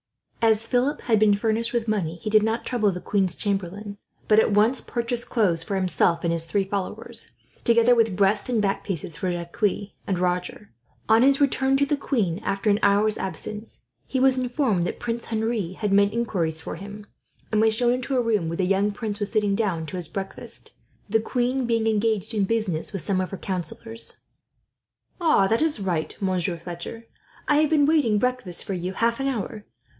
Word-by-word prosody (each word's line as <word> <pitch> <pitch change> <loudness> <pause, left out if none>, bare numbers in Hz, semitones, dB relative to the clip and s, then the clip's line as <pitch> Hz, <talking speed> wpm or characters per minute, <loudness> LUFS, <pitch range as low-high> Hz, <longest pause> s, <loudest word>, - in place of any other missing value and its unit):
As 225 0 +3
Philip 255 +4 +1
had 225 -3 +2
been 210 -1 +5
furnished 225 +2 0
with 235 -1 -1
money, 190 -7 -1
he 190 +5 -5
did 215 0 +6
not 220 +2 -1
trouble 215 -5 +1
the 180 - -5
queen's 190 -2 0
chamberlain, 200 +1 -3 0.3
but 215 0 +6
at - - +3
once 215 +5 +3
purchased 240 0 -3
clothes 185 -8 +2
for 195 +4 -3
himself 180 -2 +1
and 170 -1 +1
his 165 -1 +2
three 195 +4 0
followers, 195 0 -3 0.3
together 235 +1 +5
with 225 -5 +2
breast 200 +4 +2
and 240 -3 +1
back 200 -2 0
piece 170 -4 -4
for 185 +5 -2
Jacques 175 +3 -6 0.5
and 190 - 0
Roger. 180 +3 -2 0.4
On 220 +1 +5
his 270 +1 +5
return 270 -1 +2
to 280 - +3
the 295 - +1
queen, 210 - -1
after 205 0 0
an 205 - +2
hour's 205 +1 +3
absence, 210 +4 -5 0.2
he 265 - -1
was 265 0 +4
informed 250 - 0
that 175 - -3
Prince 235 -1 -3
Henri 220 -5 -2
had 205 +1 -2
made 200 0 +4
inquiries 180 -9 -1
for - - -6
him, 205 +3 -9 0.5
and 215 -1 +3
was 220 0 +3
shown 240 +1 +2
into 255 +1 -1
a 245 - +2
room 215 -7 +1
where 165 - -4
the 185 - +1
young 195 +2 +2
prince 210 0 -4
was 205 -1 -1
sitting 210 -3 +1
down 195 -6 -1
to 185 +4 -6
his 175 -3 -3
breakfast, 195 +2 -6 0.4
the 220 +2 +2
queen 250 +2 -1
being 230 -1 +1
engaged 220 -1 0
in 205 -3 +1
business 200 -7 -1
with 195 -6 -4
some 185 +1 0
of 185 - -3
her 195 - -6
councillors. 195 +6 -3 1.0
"That 230 - +3
is 315 -7 +1
right, 175 -5 -2
Monsieur 185 -3 0
Fletcher. 175 +7 -8 0.4
I 295 - +4
have 305 0 +3
been 300 -2 +4
waiting 285 -9 +3
breakfast 250 -7 0
for 195 - -3
you, 180 +1 -3
for - - -14
half 230 +1 +1
an 270 - -1
hour. 220 -4 -4
210 Hz, 200 wpm, -24 LUFS, 190-235 Hz, 1.0 s, did